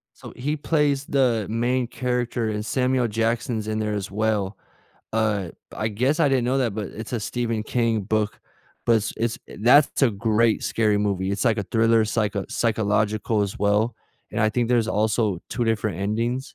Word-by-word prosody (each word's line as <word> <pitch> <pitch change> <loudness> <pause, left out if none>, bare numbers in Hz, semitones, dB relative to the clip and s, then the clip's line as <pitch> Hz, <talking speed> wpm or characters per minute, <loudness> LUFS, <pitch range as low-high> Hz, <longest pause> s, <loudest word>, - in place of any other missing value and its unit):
So - - -11
he 145 +5 -2
plays 145 -2 +1
the 120 -6 +1
main 120 +3 0
character 120 -1 -2
and 105 0 -3
Samuel 125 +1 +1
Jackson's 115 0 -1
in 110 0 -1
there 105 -1 -1
as 100 -1 -4
well. 105 -1 -1 0.6
Uh, 105 -5 0 0.3
I 110 - -1
guess 130 +9 0
I 150 - +5
didn't 130 -3 +2
know 130 +2 +1
that, 120 -6 0
but 105 -1 -3
it's 110 +2 -8
a 120 - -1
Stephen 115 0 -2
King 115 -1 0
book, 105 +1 -1 0.5
but 115 - +5
s 110 0 -2
it's 115 0 -1 0.2
that's 140 +6 +5
a 130 - +5
great 110 +2 +1
scary 105 -2 +1
movie, 100 -2 0
it's 100 - -1
like 115 -2 +2
a - - 0
thriller 115 +2 +3
psycho 105 -3 -1
psychological 110 -1 +1
as 100 -1 -4
well, 105 +3 +2 0.4
and 105 - -2
I 110 - +4
think 120 +1 0
there's 120 -2 +2
also 110 -3 +1
2 120 - -1
different 110 -5 -1
endings. 115 +6 -2
110 Hz, 180 wpm, -24 LUFS, 105-120 Hz, 0.6 s, I